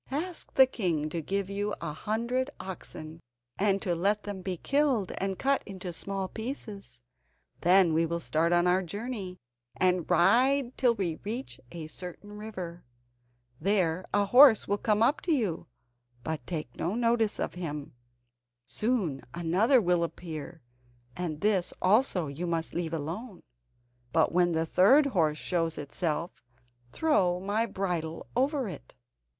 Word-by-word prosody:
"Ask 325 +6 -3
the 265 - +8
king 170 - -1
to 165 +1 -3
give 195 +4 -2
you 205 +1 -2
a 160 -3 -4
hundred 235 - -1
oxen, 160 -3 -8 0.4
and 195 0 +2
to 180 -5 0
let 200 +5 +1
them 200 -2 -5
be 185 -1 -3
killed 275 - +1
and 195 -1 -2
cut 275 0 +2
into 185 -3 -7
small 195 +2 -3
pieces. 210 - -7 0.6
Then 180 -1 +5
we 165 +1 +2
will 170 +1 -2
start 165 +1 +1
on 175 0 +4
our 180 +1 +3
journey, 200 0 -5 0.4
and 180 -2 +1
ride 250 - +4
till 245 -3 +3
we 175 -6 -2
reach 210 - -5
a 170 -2 -6
certain 180 +5 -8
river. 185 -5 -7 0.8
There 185 -2 +1
a 205 0 +2
horse 245 +2 +7
will 205 0 0
come 215 0 +2
up 275 +6 +2
to 350 - -1
you, 215 - 0 0.6
but 155 -4 -4
take 155 -8 -5
no 180 +5 -2
notice 230 -2 +1
of - - -2
him. 150 -5 -5 0.7
Soon 185 - -1
another 185 +10 +3
will 175 -4 +2
appear, 165 -2 -6 0.5
and 165 -4 -4
this 200 -4 +2
also 195 -3 +3
you 150 +5 -4
must 165 -1 -2
leave 165 -1 -3
alone, 180 - -6 0.7
but 160 +2 +3
when 175 0 +3
the 160 0 +1
third 235 - +5
horse 165 - +1
shows 165 -1 -1
itself, 155 +3 -2 0.6
throw 185 - +2
my 205 +4 0
bridle 175 -6 -3
over 270 0 +1
it." - - -9
185 Hz, 145 wpm, -29 LUFS, 165-220 Hz, 0.8 s, the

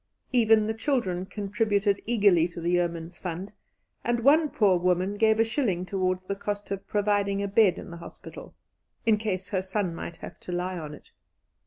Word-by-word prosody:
Even 225 -3 +4
the 220 - -1
children 220 -7 -1
contributed 205 0 0
eagerly 200 -8 +4
to 170 0 -9
the 170 +1 -1
Yeomen's 170 -1 -1
Fund, 185 +3 -5 0.5
and 240 0 0
one 300 +3 +5
poor 195 -8 +3
woman 180 +2 +1
gave 220 +1 +3
a - - +6
shilling 220 -7 -1
towards 185 -1 -1
the 200 - -2
cost 205 0 -5
of 195 -1 -4
providing 200 -1 +1
a - - -1
bed 195 -2 +4
in - - -9
the 170 - -8
hospital, 170 - -11 0.5
"in 220 -2 +4
case 195 -3 -3
her 190 -3 0
son 190 -1 -2
might 165 0 -7
have - - -10
to - - -8
lie 180 +1 -2
on 150 -2 -7
it." - - -19
195 Hz, 185 wpm, -27 LUFS, 180-215 Hz, 0.5 s, a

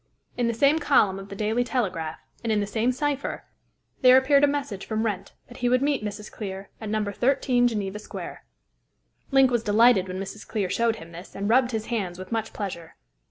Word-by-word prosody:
In 240 -1 0
the 235 - 0
same 280 +6 +4
column 210 -10 +3
of 195 +1 -10
the 200 - -7
Daily 220 +4 0
Telegraph, 180 -11 -2 0.3
and 230 - 0
in 215 - +2
the 205 - 0
same 220 +4 0
cypher, 285 +2 -2 0.6
there 255 -1 +8
appeared 280 +2 +4
a - - +7
message 280 -9 -3
from 220 0 -2
Wrent 200 -4 -3
that 245 - -13
he 245 -1 0
would 255 +2 +3
meet 285 -5 +1
Mrs. 210 0 -6
Clear 195 -2 -7
at 215 - -5
No. 215 0 0
13 245 +3 +2
Geneva 210 -3 -3
Square. 210 - -8 0.9
Link 270 -2 +5
was 240 -2 +2
delighted 220 -2 +4
when 185 0 -5
Mrs. 195 +2 -7
Clear 195 -4 -2
showed 230 +2 +1
him 170 -6 -11
this, 175 +3 -11
and 200 +1 -2
rubbed 250 +1 +4
his 220 -3 -3
hands 185 -6 -2
with 185 +2 -9
much 225 -1 -2
pleasure. 180 -5 -6
220 Hz, 205 wpm, -25 LUFS, 200-250 Hz, 0.9 s, there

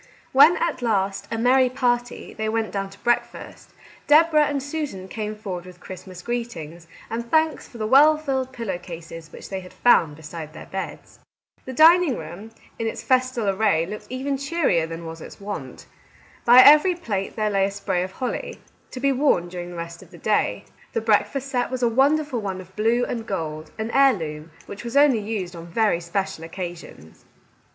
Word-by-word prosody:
When 305 +6 +7
at 330 -6 -1
last, 200 -3 0
a 225 - -3
merry 255 +2 +4
party, 245 -2 -1
they 220 0 -3
went 225 0 -1
down 195 -1 -3
to 195 - -15
breakfast, 240 0 -2 0.4
Deborah 305 0 +5
and 280 -2 -2
Susan 285 -11 -5
came 215 +1 -5
forward 185 -4 -6
with 180 -1 -13
Christmas 185 0 -10
greetings, 175 -9 -5 0.2
and 235 +1 -5
thanks 315 -2 +1
for 240 - -13
the 215 - -2
well 290 +7 +6
filled 265 -4 -2
pillow 225 -8 -4
cases 165 -2 -10
which - - -11
they 190 - -3
had 180 -1 -12
found 165 -11 +3
beside 160 0 -9
their 160 - -10
beds. 190 0 -7 0.5
The 260 - -6
dining 320 0 +6
room 175 +7 -9 0.3
in 225 - -1
its - - -5
festal 255 -4 +1
array 195 -4 +2
looked 210 +4 -8
even 270 +2 -2
cheerier 280 - +1
than 165 +1 -7
was 165 0 -8
its - - -11
wont. 205 +1 -7 0.6
By 245 +2 +9
every 305 +5 +7
plate 205 - -4
there 215 -1 0
lay 195 -1 +2
a - - -1
spray 200 -3 -2
of 185 +1 -4
holly, 255 +3 -4 0.3
to 255 - -7
be 275 +1 +2
worn 255 -10 +2
during 175 0 -6
the 175 - -9
rest 170 0 -7
of - - -15
the - - -14
day. - - 0 0.3
The - - 0
breakfast 225 +5 +1
set 245 -3 0
was 255 -1 -3
a - - +5
wonderful 270 +1 +2
one 190 -2 -4
of 185 0 -13
blue 230 +3 +2
and 230 -2 -5
gold, 155 -5 -4
an 220 +1 -3
heirloom, 165 - +2 0.2
which 200 - -9
was 235 +3 -2
only 285 -5 +5
used 205 -4 -4
on 165 0 -9
very 205 0 +1
special 170 -1 -3
occasions. 170 - -9
220 Hz, 190 wpm, -23 LUFS, 180-260 Hz, 0.6 s, By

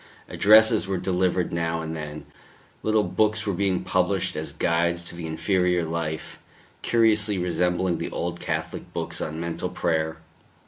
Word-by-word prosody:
Addresses 110 0 +5
were 95 -1 -1
delivered 90 -1 0
now 85 -1 -1
and 80 0 -4
then; 75 -1 -7 0.6
little 110 -1 +2
books 105 +4 +1
were 100 - 0
being 95 0 0
published - - 0
as - - -3
guides 85 +1 0
to 85 - -8
the 85 -1 -6
interior 90 +1 +1
life, 80 -1 -4 0.4
curiously 110 -3 +3
resembling 90 0 0
the - - -3
old 85 0 -4
Catholic - - -4
books - - -3
on 80 +1 -4
mental 85 +1 -3
prayer. 80 -3 -1
90 Hz, 145 wpm, -25 LUFS, 85-100 Hz, 0.6 s, Addresses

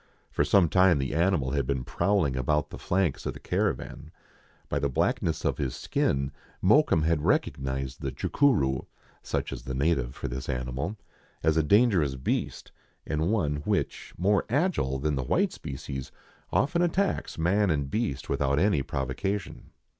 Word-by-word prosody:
For - - +1
some 95 -4 +4
time 90 0 +4
the 65 -1 -2
animal 80 -5 +1
had 70 -3 0
been 65 -2 -1
prowling 80 -2 +1
about 75 +4 0
the - - -8
flanks 90 -5 0
of - - -3
the - - -9
caravan. - - -2 0.6
By - - -1
the 70 - 0
blackness 65 - 0
of - - 0
his 65 -3 -2
skin 70 0 0 0.3
Mokoum 105 - +4
had 80 -1 +2
recognized 65 -1 -1
the 70 - -2
"chucuroo" 70 - +1 0.3
(such - - -3
is - - -6
the 65 - -5
native 65 -3 0
for - - -4
this 65 +2 -5
animal) 65 - -3 0.5
as 80 0 +3
a 80 - +4
dangerous 90 - +3
beast, 65 - -3 0.3
and 80 +3 0
one 75 -10 +1
which, 75 - -2
more 100 +3 +2
agile 140 - +1
than 75 +3 -1
the 65 - -1
white - - +1
species, 65 0 -6 0.4
often 150 +6 +2
attacks 185 +3 0
man 95 +5 +2
and 70 -4 -1
beast 105 - -2
without 70 0 +1
any 90 -4 +3
provoca 70 +10 -2
tion. - - -12
75 Hz, 160 wpm, -27 LUFS, 65-95 Hz, 0.6 s, some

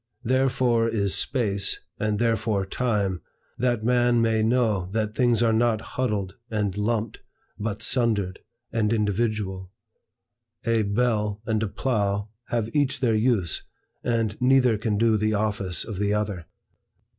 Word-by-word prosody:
Therefore 125 -2 +2
is 100 -4 0
Space, 100 -7 0 0.2
and 105 -1 0
therefore 110 -3 +1
Time, 100 -4 -1 0.4
that 120 -2 +1
man 120 0 +3
may 115 -1 +2
know 110 -5 +1
that 110 -1 -1
things 120 -1 +2
are 115 -1 +3
not 115 -1 +2
huddled 105 -7 -2
and 105 -3 -1
lumped, 110 +1 -1 0.4
but 105 0 -3
sundered 110 -7 +1 0.3
and 110 -2 +1
individual. 105 -3 -1 1.0
A 115 -1 +2
bell 105 -1 0
and 110 -2 0
a 110 - 0
plough 100 -3 -1 0.2
have 115 -1 -2
each 140 -2 +2
their 120 -3 +2
use, 110 -6 +1 0.4
and 115 -3 -1
neither 125 -2 +4
can 105 0 -1
do 115 0 +3
the 110 +1 +1
office 100 -5 -1
of 105 -4 -6
the 105 0 +1
other. 100 -5 -3
110 Hz, 135 wpm, -25 LUFS, 105-120 Hz, 1.0 s, neither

